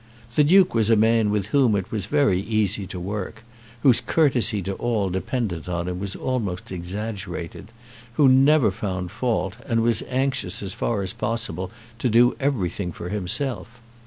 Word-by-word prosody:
The 150 Hz, -, +4 dB
Duke 185 Hz, +4 st, +5 dB
was 110 Hz, -2 st, +2 dB
a 115 Hz, -, +6 dB
man 110 Hz, 0 st, +3 dB
with 105 Hz, -1 st, -1 dB
whom 130 Hz, -7 st, +4 dB
it 95 Hz, -2 st, -3 dB
was 105 Hz, -3 st, -3 dB
very 140 Hz, -11 st, +2 dB
easy 105 Hz, -2 st, -1 dB
to 90 Hz, -1 st, -6 dB
work, 105 Hz, +4 st, -5 dB, 0.4 s
whose 130 Hz, -4 st, +5 dB
courtesy 120 Hz, -, +2 dB
to 95 Hz, -, -3 dB
all 105 Hz, -3 st, -1 dB
dependent 95 Hz, -, -3 dB
on 85 Hz, 0 st, -2 dB
him 90 Hz, 0 st, -3 dB
was 100 Hz, 0 st, -4 dB
almost 105 Hz, -10 st, -3 dB
exaggerated, 95 Hz, 0 st, -5 dB, 0.5 s
who 140 Hz, +3 st, +4 dB
never 135 Hz, -2 st, +5 dB
found 95 Hz, -3 st, -4 dB
fault, 110 Hz, -3 st, -1 dB
and 115 Hz, -1 st, +1 dB
was 115 Hz, -1 st, +4 dB
anxious 130 Hz, -8 st, -1 dB
as 95 Hz, -1 st, -5 dB
far 105 Hz, -4 st, -1 dB
as 95 Hz, +1 st, -4 dB
possible 110 Hz, -6 st, -3 dB, 0.3 s
to 125 Hz, -, +1 dB
do 120 Hz, +2 st, +4 dB
everything 100 Hz, -, -1 dB
for 85 Hz, +2 st, -7 dB
himself. 110 Hz, +4 st, -3 dB
105 Hz, 165 wpm, -23 LUFS, 95-120 Hz, 0.5 s, a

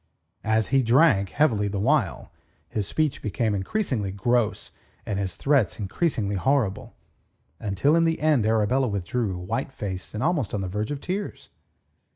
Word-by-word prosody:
And 110 Hz, +2 st, 0 dB
as 110 Hz, -1 st, +1 dB
he 135 Hz, 0 st, +4 dB
drank 120 Hz, -, +4 dB
heavily 110 Hz, -8 st, +2 dB
the 100 Hz, 0 st, -3 dB
while, 105 Hz, -, 0 dB, 0.4 s
his 105 Hz, -3 st, -3 dB
speech 155 Hz, +2 st, -1 dB
became 110 Hz, +1 st, -1 dB
increasingly 105 Hz, -, -1 dB
gross 110 Hz, +2 st, 0 dB, 0.3 s
and 100 Hz, -2 st, -2 dB
his 95 Hz, -3 st, -3 dB
threats 135 Hz, -, +2 dB
increasingly 105 Hz, -, -1 dB
horrible; 125 Hz, -2 st, 0 dB, 0.6 s
until 110 Hz, -, +1 dB
in 165 Hz, 0 st, +4 dB
the 165 Hz, 0 st, +1 dB
end 150 Hz, -8 st, +2 dB
Arabella 115 Hz, +4 st, +2 dB
withdrew, 100 Hz, 0 st, -2 dB
white 110 Hz, +10 st, -3 dB
faced 95 Hz, -4 st, -6 dB
and 110 Hz, -, -2 dB
almost 150 Hz, -, 0 dB
on 100 Hz, -, -2 dB
the 95 Hz, -, -3 dB
verge 105 Hz, +4 st, -3 dB
of 145 Hz, -1 st, -4 dB
tears. 195 Hz, +3 st, -4 dB
110 Hz, 160 wpm, -25 LUFS, 100-140 Hz, 0.6 s, he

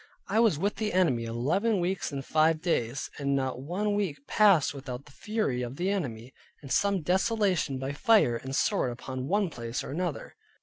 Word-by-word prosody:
I 220 Hz, -, +1 dB
was 225 Hz, -10 st, +4 dB
with 200 Hz, +6 st, -1 dB
the 215 Hz, -1 st, -2 dB
enemy 155 Hz, -11 st, +2 dB
eleven 165 Hz, -, 0 dB
weeks 180 Hz, 0 st, -1 dB
and 135 Hz, -1 st, -5 dB
five 155 Hz, 0 st, +3 dB
days, 135 Hz, -6 st, -1 dB
and 140 Hz, -1 st, 0 dB
not 130 Hz, -2 st, -2 dB
one 195 Hz, +8 st, -1 dB
week 185 Hz, -9 st, -2 dB
passed 200 Hz, -10 st, +4 dB
without 135 Hz, -1 st, -7 dB
the 150 Hz, -, -16 dB
fury 210 Hz, -, -2 dB
of 125 Hz, +1 st, -5 dB
the 180 Hz, +5 st, -1 dB
enemy, 125 Hz, -, -4 dB, 0.3 s
and 135 Hz, -, -9 dB
some 200 Hz, -4 st, +2 dB
desolation 190 Hz, -, +1 dB
by 135 Hz, +2 st, -4 dB
fire 175 Hz, -, +4 dB
and 130 Hz, +3 st, -6 dB
sword 125 Hz, -, +1 dB
upon 130 Hz, +1 st, -6 dB
one 200 Hz, 0 st, +1 dB
place 115 Hz, -1 st, -4 dB
or -, -, -6 dB
other. 175 Hz, -5 st, -4 dB
155 Hz, 185 wpm, -28 LUFS, 130-200 Hz, 0.3 s, was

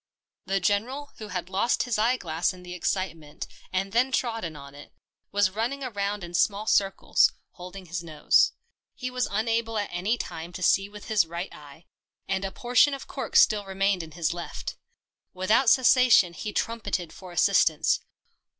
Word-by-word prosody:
The 195 Hz, 0 st, +1 dB
General, 230 Hz, +10 st, -1 dB
who 215 Hz, -, -7 dB
had 180 Hz, -4 st, -4 dB
lost 195 Hz, +5 st, +1 dB
his 235 Hz, -3 st, -1 dB
eye 240 Hz, +4 st, +3 dB
glass 165 Hz, -2 st, -1 dB
in 180 Hz, -1 st, -13 dB
the 180 Hz, 0 st, -8 dB
excitement 165 Hz, -4 st, -3 dB, 0.3 s
and 195 Hz, +1 st, -1 dB
then 250 Hz, +5 st, +2 dB
trodden 225 Hz, -11 st, -2 dB
on 140 Hz, -1 st, -11 dB
it, 145 Hz, +1 st, -13 dB, 0.4 s
was 205 Hz, -2 st, +2 dB
running 235 Hz, +7 st, -2 dB
round 205 Hz, -5 st, -3 dB
in 175 Hz, 0 st, -8 dB
small 200 Hz, +4 st, +1 dB
circles, 195 Hz, -3 st, +3 dB, 0.2 s
holding 185 Hz, +1 st, -10 dB
his 170 Hz, 0 st, -4 dB
nose. 155 Hz, -3 st, +3 dB, 0.4 s
He 255 Hz, -1 st, -5 dB
was 250 Hz, 0 st, -1 dB
unable 225 Hz, +1 st, -1 dB
at 205 Hz, -, -2 dB
any 195 Hz, +7 st, 0 dB
time 170 Hz, -5 st, -6 dB
to 185 Hz, -, -6 dB
see 195 Hz, +2 st, +3 dB
with 210 Hz, 0 st, -11 dB
his 210 Hz, -7 st, +2 dB
right 170 Hz, +3 st, -5 dB
eye, 150 Hz, +2 st, -14 dB, 0.4 s
and 190 Hz, 0 st, -1 dB
a 195 Hz, -, -3 dB
portion 250 Hz, +6 st, +3 dB
of 275 Hz, -, -9 dB
cork -, -, -6 dB
still 210 Hz, -2 st, +5 dB
remained 195 Hz, -1 st, 0 dB
in 160 Hz, -2 st, -10 dB
his 170 Hz, -2 st, -1 dB
left. 175 Hz, 0 st, -6 dB, 0.6 s
Without 215 Hz, +7 st, +3 dB
cessation 250 Hz, -8 st, +5 dB
he 210 Hz, -, -5 dB
trumpeted 200 Hz, -7 st, -2 dB
for 185 Hz, -2 st, -11 dB
assistance. 175 Hz, -4 st, +3 dB
195 Hz, 170 wpm, -26 LUFS, 175-225 Hz, 0.6 s, still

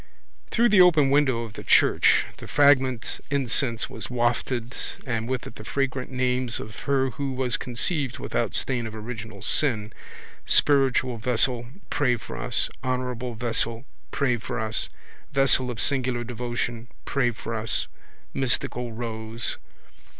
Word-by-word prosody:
Through 235 Hz, +1 st, +3 dB
the 205 Hz, -3 st, +7 dB
open 155 Hz, -6 st, +6 dB
window 135 Hz, -5 st, +3 dB
of 110 Hz, -2 st, -8 dB
the -, -, -8 dB
church -, -, +5 dB
the -, -, -9 dB
fragrant 135 Hz, -4 st, +3 dB
incense 125 Hz, -3 st, +1 dB
was -, -, -8 dB
wafted 120 Hz, 0 st, -1 dB, 0.3 s
and 115 Hz, -2 st, -2 dB
with 130 Hz, -1 st, -2 dB
it -, -, -9 dB
the -, -, -8 dB
fragrant 135 Hz, +1 st, -2 dB
names 125 Hz, -2 st, 0 dB
of 110 Hz, 0 st, -8 dB
her 135 Hz, -2 st, +2 dB
who 140 Hz, -2 st, -3 dB
was 130 Hz, -2 st, 0 dB
conceived 130 Hz, -, -1 dB
without -, -, -2 dB
stain 125 Hz, -3 st, -1 dB
of 110 Hz, -, -8 dB
original 110 Hz, -3 st, -7 dB
sin, 110 Hz, -7 st, 0 dB, 0.5 s
spiritual 130 Hz, -3 st, +3 dB
vessel, 120 Hz, +1 st, +1 dB, 0.2 s
pray 125 Hz, -5 st, +2 dB
for 115 Hz, -, -8 dB
us, -, -, 0 dB, 0.2 s
honourable 125 Hz, -1 st, -2 dB
vessel, 115 Hz, +1 st, -1 dB, 0.2 s
pray 125 Hz, -3 st, +1 dB
for 120 Hz, +2 st, -4 dB
us, 110 Hz, 0 st, -1 dB, 0.4 s
vessel 135 Hz, -2 st, +3 dB
of 120 Hz, -3 st, -5 dB
singular 130 Hz, -4 st, +1 dB
devotion, 120 Hz, 0 st, -3 dB, 0.2 s
pray 135 Hz, -3 st, +1 dB
for 115 Hz, 0 st, -6 dB
us, 110 Hz, 0 st, -1 dB, 0.5 s
mystical 125 Hz, -2 st, 0 dB
rose. 110 Hz, 0 st, -4 dB
125 Hz, 140 wpm, -25 LUFS, 115-135 Hz, 0.5 s, the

